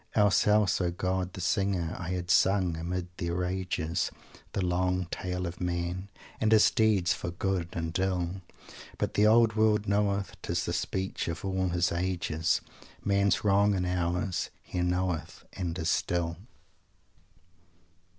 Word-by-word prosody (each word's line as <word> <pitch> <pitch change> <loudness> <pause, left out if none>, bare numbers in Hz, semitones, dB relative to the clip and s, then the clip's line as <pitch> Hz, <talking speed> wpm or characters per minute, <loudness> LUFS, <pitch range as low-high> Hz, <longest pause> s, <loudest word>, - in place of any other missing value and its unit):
Else, 105 -3 +4
else, 105 -2 +3
O 90 - +1
God, 90 +1 -2
the 95 - -6
Singer, 90 -2 0
I 90 - -5
had 90 -1 -2
sung, 90 0 +3
amid 85 +2 -3
their 85 0 -2
rages, 90 -1 -1 0.4
The 95 - 0
long 90 +1 +1
tale 90 0 -3
of 85 +1 -6
Man, 90 +2 -2 0.3
And 110 - +2
his 110 -1 +6
deeds 105 -6 +3
for - - -4
good 90 0 -2
and 80 -1 -3
ill. 95 -1 -1 0.6
But - - -1
the 105 +1 +4
Old 115 0 +5
World 110 -1 +3
knoweth 100 0 0
'tis 85 0 -1
the 85 - -2
speech 95 +2 -2
of 85 +2 -4
all 95 -1 0
his 85 0 +1
ages 85 -2 0 0.4
Man's 100 0 +2
wrong 100 0 +4
and 90 -1 0
ours; 90 +1 -1
he 90 - -3
knoweth 90 -2 -1
and 90 -2 -3
is 80 +1 0
still." 85 -2 0
90 Hz, 150 wpm, -29 LUFS, 85-95 Hz, 0.6 s, his